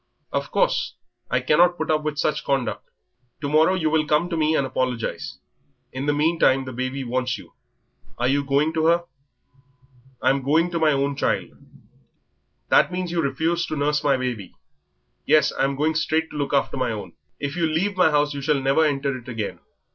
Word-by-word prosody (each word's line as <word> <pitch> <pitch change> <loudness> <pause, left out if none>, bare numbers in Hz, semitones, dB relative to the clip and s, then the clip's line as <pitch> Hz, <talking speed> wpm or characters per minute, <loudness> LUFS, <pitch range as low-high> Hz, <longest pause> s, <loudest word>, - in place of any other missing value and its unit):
Of - - -2
course, - - 0 0.3
I 125 - +1
cannot 175 +7 +4
put 160 -1 -1
up 155 -1 +2
with 150 -1 -3
such 150 0 0
conduct 135 -3 -2 0.5
to 145 - -3
morrow 155 +5 +4
you 160 -4 0
will 155 -1 +1
come 155 +4 +1
to - - 0
me 155 0 +2
and 140 - +1
apologise. 130 -3 -3 0.6
In 130 +2 -4
the - - +4
meantime 145 -3 +2
the 130 - -7
baby 130 +2 -3
wants 125 0 -1
you, - - -15 0.6
are 120 - 0
you 140 +2 +2
not 140 - -5
going 145 +3 +2
to 160 -1 0
her?" 170 +1 +3 1.2
"I'm 135 +1 +2
going 160 +6 +2
to 170 - -1
my 155 -1 +4
own 140 0 0
child." - - -1 1.2
"That - - +4
means 180 -1 -3
that 175 - -3
you - - +3
refuse 160 +5 0
to 155 - -3
nurse 150 +1 0
my 140 -2 +3
baby?" 120 -7 -4 0.7
"Yes, 150 -1 +4
I'm 135 0 0
going 155 +3 +1
straight 160 0 0
to - - -10
look 145 -1 -2
after 140 -1 0
my 125 -2 0
own." 105 -2 -6 0.3
"If 145 +1 -3
you 170 -2 +1
leave 180 +6 0
my 180 -3 +4
house 150 -1 +1
you 140 - -5
shall 150 0 +1
never 135 +4 +2
enter 140 -2 0
it 125 -1 -10
again." 115 -3 -4
145 Hz, 200 wpm, -23 LUFS, 135-160 Hz, 1.2 s, cannot